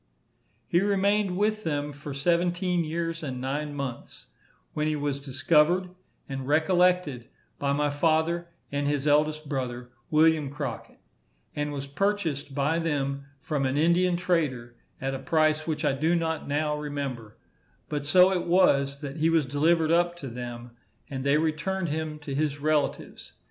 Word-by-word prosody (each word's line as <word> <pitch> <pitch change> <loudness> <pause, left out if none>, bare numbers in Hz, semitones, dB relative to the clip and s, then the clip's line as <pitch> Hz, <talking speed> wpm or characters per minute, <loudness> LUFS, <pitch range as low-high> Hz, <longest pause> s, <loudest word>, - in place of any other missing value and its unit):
He 175 - +3
remained 200 -1 +1
with 215 +1 +1
them 145 -2 -2
for 145 0 -8
seventeen 175 +4 +1
years 165 +1 -3
and 130 -5 -4
nine 145 +3 -3
months, 135 -4 -6 0.4
when 150 0 -1
he 155 - 0
was 145 -1 -2
discovered 150 +6 +2 0.4
and 135 -1 -5
recollected 160 -4 +2 0.3
by 140 0 0
my 145 0 +1
father 160 +3 +1 0.2
and 145 0 -1
his 145 -1 0
eldest 150 +1 +2
brother, 125 -3 -4 0.2
William 155 -2 +3
Crockett; 145 - -6 0.6
and 150 0 -2
was 140 -1 -4
purchased 150 -3 -1
by 145 +4 +1
them 140 -4 -2 0.2
from 150 -3 -1
an 130 +2 -1
Indian 175 +3 +3
trader, 145 -10 -1 0.2
at 135 +1 -2
a 135 - -3
price 155 0 +1
which 155 -1 -2
I 145 - +3
do 160 +5 +1
not 160 -2 -2
now 150 +1 0
remember; 140 -7 -5 0.5
but 145 -1 -3
so 180 +6 +5
it 180 - -2
was, 140 -6 +3
that 140 0 -6
he 160 +1 +2
was 165 -3 +3
delivered 155 +4 +2
up 175 +1 +3
to 140 -6 -7
them, 120 0 -7 0.4
and 130 -1 -4
they 140 +2 +3
returned 165 +4 -1
him 155 0 -3
to 145 -2 -6
his 145 0 -1
relatives. 150 0 -1
150 Hz, 155 wpm, -27 LUFS, 140-170 Hz, 0.6 s, so